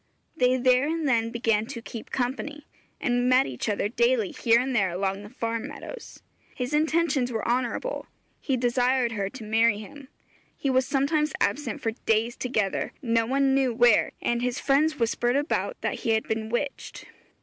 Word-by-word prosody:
They 255 -3 +3
there 255 +2 +3
and 320 -1 -1
then 230 -3 +2
began 225 -2 0
to 265 -3 -6
'keep 230 -1 -9
company,' 265 +4 -3 0.3
and 245 0 +1
met 255 +1 +5
each 130 - -4
other 205 -1 0
daily 460 - +1
here 235 -6 +3
and 260 +1 -1
there 195 -4 +3
along 190 +2 -2
the 205 - -10
farm 230 -1 -3
meadows. - - -10 0.3
His 250 +2 -3
intentions 305 -4 +1
were 225 -2 -3
honourable; 250 - -1 0.3
he 265 -3 -1
desired 245 0 +2
her 200 -3 -2
to 250 +1 -10
marry 220 0 +3
him. 265 +6 -11 0.5
He 275 - 0
was 260 0 +2
sometimes 300 +2 +1
absent 285 +6 -1
for 225 - 0
days 225 +1 0
together, 220 -6 -1
no 230 -2 +1
one 270 +1 +2
knew 265 -3 +2
where, 240 -2 +4
and 240 0 0
his 250 +1 -1
friends 305 +3 +2
whispered 240 +1 +1
about 295 - -1
that - - -2
he 225 - +1
had 220 - +1
been 220 0 -3
witched. 270 +4 -4
245 Hz, 175 wpm, -26 LUFS, 225-275 Hz, 0.5 s, met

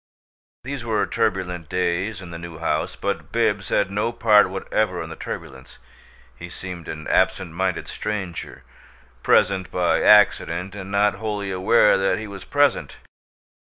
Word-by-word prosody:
These 135 -1 -5
were 110 -2 0
turbulent 90 -3 -2
days 90 +3 -1
in 85 - -10
the 85 - -7
New 85 -1 -9
House, 85 - -1
but - - -4
Bibbs - - 0
had 95 - +1
no 105 +3 0
part 105 -4 +4
whatever 95 0 -1
in 80 - -9
the - - -7
turbulence 65 -1 -8 0.6
he 85 - -9
seemed 90 -1 -8
an 75 0 -6
absent 95 -2 +1
minded 90 0 -2
stranger, 95 -5 -5 0.6
present 95 +5 +2
by 90 -1 +1
accident 95 -3 +4
and 95 -2 -8
not 100 +1 +2
wholly 100 -1 -4
aware 95 +2 +4
that 95 +3 +1
he 110 - -5
was 100 -2 -9
present. 145 -2 +1
95 Hz, 150 wpm, -22 LUFS, 90-105 Hz, 0.6 s, part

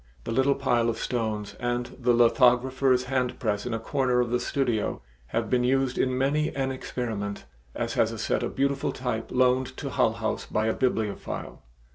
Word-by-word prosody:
The - - -4
little 135 +3 +3
pile 120 -4 +1
of 115 - -2
stones 110 -4 -2
and 120 0 -2
the 125 -1 +2
lithographer's 125 +2 +4
handpress 125 -5 -1
in 120 - -2
a - - -2
corner 125 +1 +1
of 120 -1 0
the 125 - +2
studio 125 - -1 0.2
have 115 - -1
been 125 +2 +2
used 130 0 +2
in 130 -1 +1
many 150 +4 +1
an 135 -1 0
experiment, 110 - -4 0.3
as - - -2
has - - +2
a - - -6
set - - 0
of - - -3
beautiful 140 0 0
type 125 -3 -3
loaned 125 0 +2
to 140 - -4
Hull 115 - +2
House 110 -1 -3
by 110 - 0
a 110 - +2
bibliophile. 110 -6 -2
125 Hz, 180 wpm, -27 LUFS, 115-130 Hz, 0.3 s, lithographer's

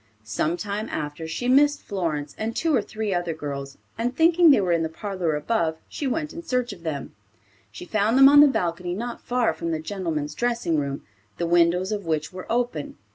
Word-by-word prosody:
Some 150 +11 -1
time 205 +2 -4
after, 150 +2 -4
she 205 +10 -3
missed 290 +3 +4
Florence 160 -7 -3
and 225 +1 -3
two 320 -3 +1
or 235 - +3
three 215 0 -3
other 175 -2 -1
girls, 140 -3 -6 0.2
and 245 +2 -1
thinking 335 +1 +5
they 275 - +6
were 185 -3 0
in 170 -1 +2
the 160 - -1
parlor 180 -2 -2
above, 160 0 0
she 285 - -4
went 300 +4 -2
in 335 - -6
search 250 -7 -1
of 180 - -14
them. 150 -5 -5 0.6
She 105 - -9
found 215 +5 +1
them 270 0 +9
on 290 +1 +8
the 295 - +8
balcony 175 -7 -1
not 235 +4 -5
far 245 -1 +1
from 170 - -4
the 160 -1 -1
gentlemen's 160 -4 -3
dressing 235 -9 0
room, 140 -1 -4 0.3
the 170 - -1
windows 175 +3 +3
of 205 -4 -3
which 155 +1 -1
were 185 +3 -7
open. 235 -11 -2
185 Hz, 205 wpm, -24 LUFS, 160-240 Hz, 0.6 s, them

